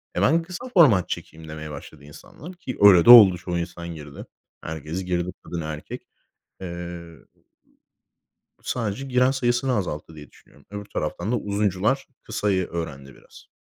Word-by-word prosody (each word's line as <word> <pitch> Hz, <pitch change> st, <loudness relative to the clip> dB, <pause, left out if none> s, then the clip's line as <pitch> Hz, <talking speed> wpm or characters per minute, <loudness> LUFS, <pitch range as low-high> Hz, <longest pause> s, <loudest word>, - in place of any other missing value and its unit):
Eee, -, -, 0 dB
ben 165 Hz, +4 st, +3 dB
kısa 185 Hz, +9 st, -8 dB
format 120 Hz, -, +5 dB
çekeyim" 80 Hz, +1 st, -7 dB
demeye 75 Hz, 0 st, -7 dB
başladı 70 Hz, 0 st, -11 dB
insanlar 150 Hz, -, -12 dB
ki 170 Hz, -8 st, -8 dB
öyle 95 Hz, -5 st, +7 dB
de -, -, +4 dB
oldu. 105 Hz, -7 st, +10 dB
Çoğu 85 Hz, 0 st, -4 dB
insan 85 Hz, 0 st, -6 dB
girdi. 75 Hz, -2 st, -10 dB, 0.4 s
Herkes 80 Hz, +3 st, -5 dB
girdi 90 Hz, 0 st, -2 dB
kadın, 85 Hz, -1 st, -5 dB
erkek. 75 Hz, -1 st, -7 dB, 0.5 s
Eee 95 Hz, -, -6 dB
ö 85 Hz, -2 st, -8 dB, 1.4 s
ü -, -, -31 dB
sadece 115 Hz, +1 st, -3 dB
giren 125 Hz, 0 st, +3 dB
sayısını 125 Hz, -1 st, 0 dB
azalttı 80 Hz, -5 st, -4 dB
diye 75 Hz, -2 st, -12 dB
düşünüyorum. 70 Hz, -, -23 dB
Öbür 105 Hz, 0 st, -7 dB
taraftan 90 Hz, +3 st, -4 dB
da 125 Hz, -, +2 dB
uzuncular 105 Hz, +6 st, -1 dB, 0.2 s
kısayı 100 Hz, -4 st, -1 dB
öğrendi 70 Hz, -5 st, -7 dB
biraz. -, -, -18 dB
90 Hz, 155 wpm, -23 LUFS, 80-120 Hz, 1.4 s, oldu